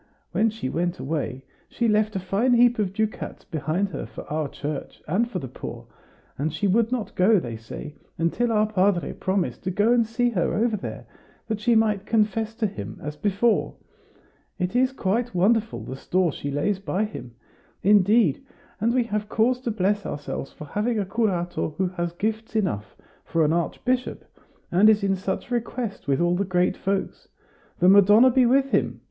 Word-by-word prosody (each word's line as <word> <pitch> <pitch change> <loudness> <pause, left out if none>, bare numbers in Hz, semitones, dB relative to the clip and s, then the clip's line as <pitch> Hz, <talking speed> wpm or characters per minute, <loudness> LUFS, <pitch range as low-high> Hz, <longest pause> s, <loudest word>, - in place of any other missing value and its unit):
When 225 +1 +2
she 220 -8 -5
went 175 +5 -1
away, 135 -2 -3 0.3
she 235 - 0
left 215 0 +2
a - - 0
fine 205 +7 +1
heap 240 -1 +4
of 200 -3 0
ducats 215 +2 -3
behind 165 +3 -1
her 155 - -5
for - - -9
our 155 -1 -1
church, 145 0 -6
and 215 +9 +1
for 200 - -4
the 135 - -5
poor; 125 - -8 0.5
and 155 +3 0
she 155 +6 -2
would 225 +4 +2
not 230 -6 -2
go, 195 +3 +4
they 120 -7 -6
say, 115 +7 -8 0.2
until 200 +9 0
our 215 -1 +3
padre 200 -4 +1
promised 190 -1 -2
to - - 0
go 205 +6 +3
and 240 -1 +4
see 240 +2 0
her 180 -6 0
over 225 0 +1
there, 195 - -6 0.4
that 220 -2 -2
she 235 +2 +2
might 210 -3 +2
confess 220 0 +1
to 225 - -1
him 105 - -5
as 150 0 -5
before. 205 +6 +1 0.8
It 180 +5 -2
is 255 +1 +3
quite 230 -2 -1
wonderful, 225 +5 +2
the 130 - -6
store 175 +5 0
she 140 - -5
lays 155 +8 0
by 200 +1 -1
him! 125 - -9 0.5
Indeed, 205 - +4 0.4
and 230 +4 +1
we 250 - +3
have 210 -2 -3
cause 245 +3 +2
to 245 - -2
bless 205 -1 0
ourselves 145 -1 -5
for 150 - -10
having 215 +9 -1
a 205 - 0
curato 180 -7 -1
who 185 -1 +1
has 175 -2 -3
gifts 220 +4 -3
enough 105 - -1 0.3
for 165 -1 +1
an 150 - +2
archbishop, 250 +9 -1 0.5
and 195 +5 +6
is 215 -1 +3
in 195 -1 +2
such 190 +5 -4
request 235 - -3
with 135 -1 +2
all 175 0 +2
the 195 - +1
great 180 -2 +1
folks. 195 0 -3 0.5
The 180 - +3
Madonna 205 +6 +7
be 250 0 +4
with 275 +2 +3
him!" - - +1
200 Hz, 185 wpm, -24 LUFS, 175-225 Hz, 0.8 s, Madonna